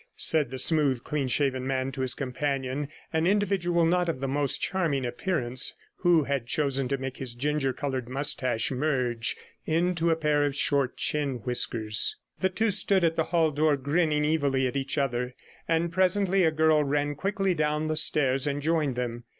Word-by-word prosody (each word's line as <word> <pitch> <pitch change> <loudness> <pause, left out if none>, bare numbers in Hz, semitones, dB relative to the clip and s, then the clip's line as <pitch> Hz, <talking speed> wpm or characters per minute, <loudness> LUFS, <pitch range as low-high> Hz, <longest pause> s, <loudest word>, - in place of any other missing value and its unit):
said 155 -5 +3
the 130 - -6
smooth, 140 -3 +2
clean 145 -3 -2
shaven 130 0 0
man 135 0 -1
to 130 - -5
his 130 -1 +1
companion, 135 +1 -3 0.3
an 160 +1 +1
individual 190 -4 +1
not 175 +1 +1
of 155 - -3
the 135 - -2
most 140 0 0
charming 160 -9 -1
appearance, 125 -1 -1 0.2
who 175 -4 +3
had 135 -3 -2
chosen 135 -1 0
to 140 +2 -1
make 135 0 -6
his 125 -3 -6
ginger 140 +1 0
coloured 130 -2 -4
moustache 130 -3 0
merge 125 -4 -1 0.3
into 170 +1 +1
a 165 - +3
pair 150 -2 +1
of 145 -1 -1
short 140 -3 +1
chin 145 -3 0
whiskers. 115 -3 +1 0.2
The 190 - +1
two 220 +3 0
stood 195 -1 +3
at 165 -1 +2
the 160 - 0
hall 165 -2 +1
door, 150 0 +2
grinning 150 +2 +1
evilly 140 -4 +1
at 125 - -2
each 135 +2 -2
other; 125 -2 -1 0.3
and 165 +1 0
presently 190 +1 +2
a 160 - +3
girl 155 -1 +3
ran 145 +1 -1
quickly 195 +5 -1
down 150 -1 -1
the 155 0 -1
stairs 135 -3 +2
and 145 0 -1
joined 155 -3 0
them. 120 -1 -4
145 Hz, 180 wpm, -27 LUFS, 130-160 Hz, 0.3 s, said